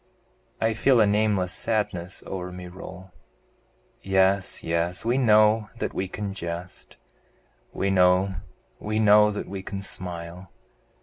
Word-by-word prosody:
I 110 0 +1
feel 125 +3 +3
a 110 - +6
nameless 105 -3 +1
sadness 100 -5 -2
o'er 90 -1 -5
me 90 0 -8
roll, 95 +1 -11 0.9
Yes, 95 0 +1
yes, 85 +4 -1
we 120 +3 +2
know 110 -2 +4
that - - -3
we 95 - -2
can 100 +1 -5
jest, 85 -1 -7 0.7
We 100 0 -1
know, 90 0 +3 0.4
we 105 +1 -3
know 105 -1 +6
that 105 - -5
we 95 0 -6
can 100 +1 -6
smile! 90 -1 -6
95 Hz, 130 wpm, -25 LUFS, 90-105 Hz, 0.9 s, a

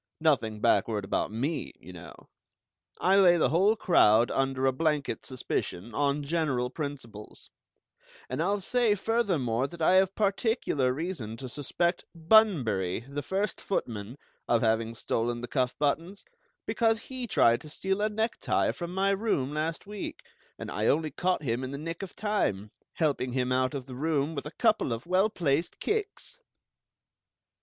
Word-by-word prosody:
Nothing 115 -9 +1
backward 105 -3 +2
about - - -1
me, 140 +9 -3
you 90 - -12
know. 90 0 -10 0.8
I 190 +2 +4
lay 175 -3 +6
the 155 - +3
whole 190 +8 +3
crowd 120 - +4
under 135 0 0
a 135 - +4
blanket 150 +1 -1
suspicion, 120 -5 -4
on 145 0 0
general 140 -5 0
principles; 130 -9 -7 0.8
and 130 +4 -3
I'll 200 +4 0
say, 235 +1 +2
furthermore, 175 - 0
that 170 +3 -11
I 180 +4 +4
have 190 0 +3
particular 200 - +1
reason 130 - -4
to 130 - -7
suspect 170 +7 -1
Bunbury, 160 - +3
the 140 +4 -6
first 195 +7 -2
footman, 115 - -3 0.3
of 120 -1 +2
having 115 0 +1
stolen 120 +1 -2
the 120 - -5
cuff 125 -2 0
buttons, 165 +7 -1 0.4
because 225 -1 +1
he 255 -1 -6
tried 120 - +4
to 155 - -11
steal 190 +6 -2
a 215 - +2
necktie 220 +2 0
from 175 +1 -6
my 195 +1 +2
room 195 - 0
last 160 +4 -2
week, 205 0 -6 0.4
and - - -7
I - - -1
only 155 +1 +2
caught 180 +2 0
him 120 -1 -1
in 130 - -4
the 140 - -5
nick 165 +4 -5
of 195 - -7
time, 110 - -1 0.2
helping 140 -6 0
him 125 -1 0
out 130 +2 +1
of 135 -3 -5
the 130 - -10
room 150 +2 0
with 145 -1 -5
a - - -8
couple 215 - +2
of 115 +3 -6
well 185 +4 +3
placed 165 -5 -1
kicks!" 435 +3 -3
150 Hz, 160 wpm, -28 LUFS, 125-190 Hz, 0.8 s, lay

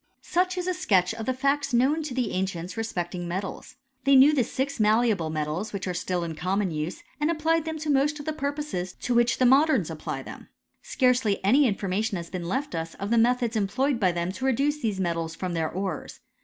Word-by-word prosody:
Such 365 +1 0
is 360 - -2
a 365 - 0
sketch 195 - +2
of 225 +1 -6
the 260 - +2
facts 275 0 0
known 275 +6 +3
to 300 -5 -5
the 250 -5 0
ancients 185 -1 -3
respecting 180 -5 -3
metals. 190 +7 -5 0.3
They 275 0 +5
knew 275 +3 +7
the 270 -4 +3
six 265 +3 -3
malleable 215 -5 +2
metals 155 +7 -3
which 195 -1 -4
are 180 - -1
still 180 0 -2
in 165 -1 -4
common 185 +4 -1
use, 155 +2 -4 0.2
and 300 +1 +1
applied 325 0 +1
them 320 -1 -3
to 310 0 -4
most 290 +2 +2
of 290 - -8
the 315 - -2
purposes 280 -11 -3
to 250 - -3
which 240 0 +3
the 255 - +3
modems 285 +5 +4
apply - - -5
them. - - -11 0.3
Scarcely 250 -5 +1
any 265 +7 +5
information 200 +1 -1
has 170 -1 -7
been 180 -2 -4
left 275 +7 -2
us 165 0 -4
of 200 +2 -5
the 235 - +4
methods 240 0 +2
employed 240 +6 0
by 185 -5 +3
them 170 +1 -2
to 260 +7 -5
reduce 280 +4 +1
these 210 -4 -1
metals 165 -2 -2
from 180 0 -4
their 160 -2 -1
ores. 185 -3 -4
225 Hz, 215 wpm, -26 LUFS, 185-275 Hz, 0.3 s, knew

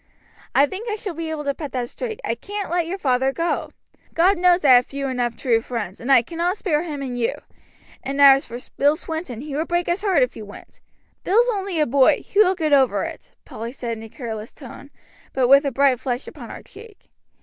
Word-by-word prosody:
"I 280 - +6
think 395 - -6
I 425 - -1
shall 410 -4 -6
be 325 0 -5
able 310 -2 -4
to 280 -1 -1
put 290 -3 -7
that 250 -2 -2
straight. 445 - -6
I 230 - 0
can't 400 - -6
let 345 -1 0
your 375 +3 -3
father 265 -5 +1
go. 335 +4 -2 0.5
God 355 +3 +3
knows 355 -2 +3
I 270 - +7
have 245 0 +5
few 275 0 -4
enough 245 -3 -2
true 230 -3 +1
friends, 225 -6 -5
and 250 +4 -2
I 245 -3 +6
cannot 345 - -2
spare 310 -8 0
him 300 -5 -5
and 250 -2 -4
you; 230 - 0 0.7
and 275 +1 -4
as 275 -1 +7
for 235 - -7 0.2
Bill 290 +2 +4
Swinton, 315 -7 -6
he 290 -1 -6
would 315 +3 -2
break 345 0 0
his 345 +3 -1
heart 380 -10 +3
if 250 - -2
you 220 - -8
went." 205 0 -14 0.4
"Bill's 465 +6 +3
only 390 -4 -3
a 305 - +3
boy; 265 +1 +3
he 405 - -1
will 380 -3 +5
get 310 -4 0
over 270 -2 +3
it," - - -8
Polly 230 +2 -7
said 240 -3 -5
in 220 - -10
a 225 - -10
careless 220 -3 -7
tone, 275 0 -12 0.4
but 260 -2 +2
with 275 +3 +6
a 280 - 0
bright 270 -1 +2
flush 250 0 -3
upon - - -10
her - - -9
cheek. 450 -3 -16
280 Hz, 230 wpm, -22 LUFS, 250-345 Hz, 0.7 s, I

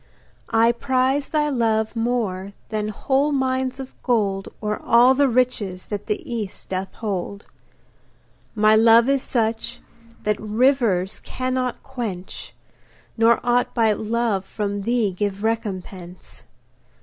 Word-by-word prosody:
I 225 +1 +4
prize 260 +3 0
thy 300 -1 +1
love 225 -4 0
more 220 -5 -1 0.2
than 215 -1 -2
whole 270 +7 0
mines 260 -1 -1
of 265 -1 -7
gold 200 -6 0
Or 210 -1 -3
all 240 +3 +5
the 280 0 +3
riches 230 -7 0
that 205 -1 -4
the 210 - 0
East 220 -5 -5
doth 190 0 -3
hold. 200 -1 -4 1.1
My 215 0 +5
love 230 +2 +6
is 275 -1 +2
such 230 0 -2 0.4
that 210 0 0
rivers 215 -4 +1
cannot 255 -1 -3
quench, 225 -9 -6 0.6
Nor 230 0 +4
aught 245 0 +1
but 220 -3 +2
love 220 -3 0
from 205 0 -3
thee 230 -1 +1
give 200 +2 -3
recompense. 190 -5 -5
225 Hz, 125 wpm, -22 LUFS, 205-250 Hz, 1.1 s, love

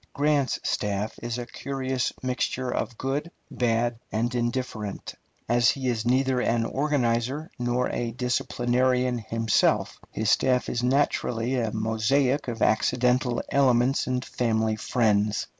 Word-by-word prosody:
Grant's 145 -2 +1
staff 105 +1 -2
is 120 0 -3
a 120 - -4
curious 130 -1 -2
mixture 130 0 -1
of 115 - -3
good, 140 +5 -2 0.2
bad, 120 -1 0
and 115 +3 -1
indifferent. 120 -4 -3 0.3
As 120 -1 +4
he 135 -2 -1
is 115 -1 -1
neither 130 0 +2
an 115 -1 +1
organizer 135 +1 0
nor 120 +1 0
a 120 - -2
disciplinarian 125 +1 0
himself, 115 0 +1
his 110 0 0
staff 125 -1 +2
is 120 - -1
naturally 125 -2 +1
a 115 -4 0
mosaic 115 +6 +1
of 115 -2 -2
accidental 125 +2 +2
elements 130 -1 +3
and 125 0 -1
family 110 -2 0
friends. 105 -2 +1
120 Hz, 125 wpm, -26 LUFS, 115-130 Hz, 0.3 s, As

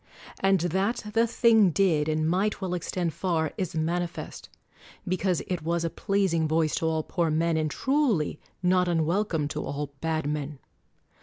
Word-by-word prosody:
And 195 -2 +3
that 190 +7 0
the 230 +1 +3
thing 225 -4 +4
did 160 -4 +2
and 155 0 0
might 190 +5 +1
well 190 -3 -3
extend 175 -1 -2
far 165 -4 -1
is 185 -4 -3
manifest; 170 +2 -3 0.6
because 185 -1 0
it 180 -3 -3
was 170 +1 -1
a 165 - -2
pleasing 190 -6 0
voice 160 0 +1
to 160 - 0
all 160 -1 0
poor 170 0 -1
men, 165 +2 +1
and 155 -1 0
truly 260 - 0 0.2
not 180 0 +3
unwelcome 170 -1 0
to - - -4
all 145 0 -4
bad 160 -1 -1
men. 150 -1 -3
170 Hz, 160 wpm, -27 LUFS, 155-190 Hz, 0.6 s, thing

